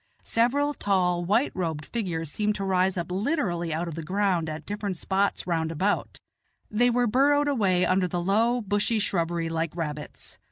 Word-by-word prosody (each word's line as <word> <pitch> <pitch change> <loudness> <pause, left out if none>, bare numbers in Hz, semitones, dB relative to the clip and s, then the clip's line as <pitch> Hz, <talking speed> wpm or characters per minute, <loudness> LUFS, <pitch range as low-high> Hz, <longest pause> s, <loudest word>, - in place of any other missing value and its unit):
several 280 +6 +1
tall 180 -6 +1
white 215 +10 +2
robed 160 -5 -3
figures 165 -9 -3
seem 210 +5 0
to 205 -1 -3
rise 190 -1 +1
up 175 0 -3
literally 185 - -1
out 165 +3 -2
of 170 - -5
the 165 - -5
ground 185 -1 0
at 155 0 -6
different 205 -2 -3
spots 195 +3 0
round 165 -2 -1
about; 190 +6 -1 0.5
they 240 +3 +3
were 245 0 +2
burrowed 285 +5 +3
away 195 -10 +2
under 185 0 +2
the 175 0 -2
low, 230 +6 +2
bushy 205 +2 0
shrubbery 170 -5 0
like 165 0 -2
rabbits. 150 -3 -6
190 Hz, 170 wpm, -26 LUFS, 170-215 Hz, 0.5 s, they